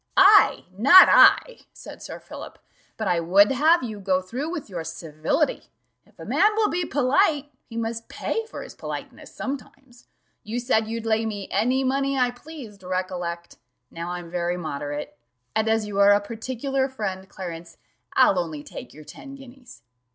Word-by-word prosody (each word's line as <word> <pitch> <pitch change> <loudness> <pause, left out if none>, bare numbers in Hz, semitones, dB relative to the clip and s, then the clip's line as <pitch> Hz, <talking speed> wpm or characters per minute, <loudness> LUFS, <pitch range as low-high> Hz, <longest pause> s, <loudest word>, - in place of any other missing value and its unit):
"I!' 395 +2 +6
not 280 - +8
I," - - +6
said - - -12
Sir - - -8
Philip; - - -10 0.4
"but 220 - -3
I 175 -2 +2
would 190 +6 +4
have 315 +5 +3
you 215 -4 -5
go 190 -1 +1
through 245 - -5
with 330 -4 -5
your 175 -5 -6
civility: 165 - -2 0.4
if - - -28
a - - -10
man 420 0 +2
will 435 -1 +2
be 350 +1 -1
polite, 290 +2 +1 0.2
he 230 - -8
must 230 0 -4
pay 450 - -3
for - - -8
his - - -11
politeness - - -8
sometimes. 270 -2 -8 0.4
You 225 +3 -4
said 225 -3 +1
you'd 230 0 -5
lay 225 0 +1
me 205 -3 -5
any 250 +7 +1
money 275 +1 0
I 250 -1 +2
pleased, 245 -6 -12
recollect 180 -2 -4 0.3
now 170 +1 -6
I'm 175 -1 -6
very 175 0 -1
moderate 145 -3 -5 0.4
and 220 0 +1
as 220 -1 +1
you 200 -1 -4
are 200 0 +7
a 205 - +4
particular 260 +5 -3
friend, 195 -6 -5
Clarence, 170 -3 -8 0.4
I'll 190 - +4
only 160 -4 -4
take - - -10
your 155 - -12
ten 275 - -11
guineas." 250 - -15
220 Hz, 170 wpm, -24 LUFS, 185-270 Hz, 0.4 s, not